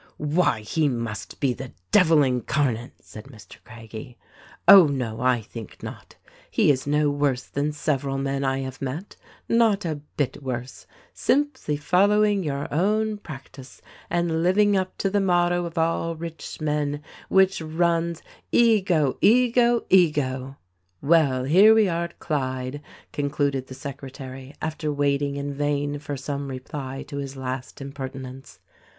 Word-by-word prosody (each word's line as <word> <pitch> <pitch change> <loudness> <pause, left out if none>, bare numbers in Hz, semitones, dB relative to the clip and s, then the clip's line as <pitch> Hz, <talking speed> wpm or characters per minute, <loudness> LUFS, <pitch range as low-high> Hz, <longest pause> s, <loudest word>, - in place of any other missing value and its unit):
"Why, 160 -10 +2
he 150 +8 0
must 115 -4 -5
be 135 -3 +1
the 130 0 -9 0.2
devil 160 -4 +5
incarnate," 125 -1 -1
said 110 - -11
Mr. 110 -8 -14
Craggie. 115 +2 -10 0.5
"Oh, 190 -5 +10
no, 125 -6 -3
I 125 -2 +2
think 115 -1 -10
not; - - -9 0.3
he - - +3
is 130 0 -2
no 150 0 +2
worse 140 -3 0
than 145 +2 -2
several 140 -2 -1
men 135 0 -2
I 135 0 0
have 130 -1 -7
met. 140 +9 -5 0.3
Not 225 -4 +3
a 155 -3 -3 0.2
bit 145 -1 -1
worse. 125 -1 -6 0.3
Simply 265 - 0
following 205 +6 +3
your 140 -2 -3
own 210 +5 +1
practice, 135 -6 -11 0.3
and 170 -2 0
living 200 +4 +3
up 185 -1 -1
to 195 - -1
the 205 0 +2
motto 175 -1 +2
of 170 -1 -8
all 165 0 0
rich 165 0 -7
men, 150 -1 -1 0.3
which 190 -2 +3
runs, 170 +1 0 0.3
'EGO! 190 - +3
EGO! 240 +1 +4
EGO 135 -7 +2
!' 90 0 -47
" 90 - -45
"Well, 140 -4 +3
here 190 +11 +6
we 220 -2 +4
are 170 -1 -1
at 170 - -11
Clyde," 130 -2 -3 0.3
concluded 140 -2 -1
the 130 - -9
secretary 135 -1 -8
after 155 -1 -2
waiting 140 0 0
in 140 0 -4
vain 145 0 -1
for 145 -1 -5
some 140 +1 -4
reply 135 0 -6
to 145 -1 -6
his 140 -1 -5
last 130 0 -5
impertinence. 135 -5 -8
145 Hz, 145 wpm, -24 LUFS, 130-170 Hz, 0.5 s, Oh